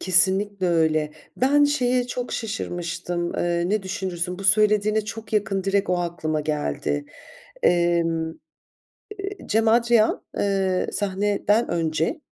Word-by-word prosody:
Kesinlikle 190 +1 +2
öyle. 155 -2 +1 0.2
Ben 285 +3 +4
şeye 250 -4 +1
çok 250 0 -4
şaşırmıştım, 175 -5 -3
eee, 175 0 0
ne 210 0 0
düşünürsün, 185 -2 -3
bu 195 - -7
söylediğine 210 +2 +3
çok 220 +1 -8
yakın 195 -2 0
direkt 195 -1 +1
o 180 - +2
aklıma 160 -3 -2
geldi. 145 -1 -2 0.6
Emm, 170 -2 +2 0.9
eee, 395 0 -5
Cem 225 +1 +1
Adrian, 230 -1 +3
eee, 195 -2 0
sahneden 205 +2 0
önce 165 - -1
195 Hz, 115 wpm, -23 LUFS, 170-215 Hz, 0.9 s, Ben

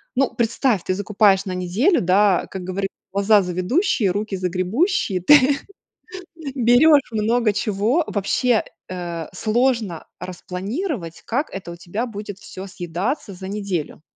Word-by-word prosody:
ну, 270 0 +1
представь, 230 -3 +1
ты 185 - 0
закупаешь 205 -1 +3
на 185 - -3
неделю, 200 - +2
да, 190 +1 +3
как 190 -1 -6
говорит, 190 +2 -3 0.2
глаза 200 +1 +4
завидущие, 195 - +1
руки 205 +1 -2
загребущие. 185 - 0
Ты 280 +6 +6 1.0
берешь 265 +4 +5
много 220 0 +1
чего. 215 - +1
Вообще, 220 +3 +1 0.3
э, 170 -3 -5
сложно 220 -3 0 0.2
распланировать, 185 - -5
как 280 +7 -1
это 185 -3 -6
у - - -7
тебя 190 +7 -4
будет 205 -4 -7
всё 190 -2 -9
съедаться 190 - -3
за 190 +1 -8
неделю. 195 -8 -4
205 Hz, 125 wpm, -21 LUFS, 185-240 Hz, 1.0 s, Ты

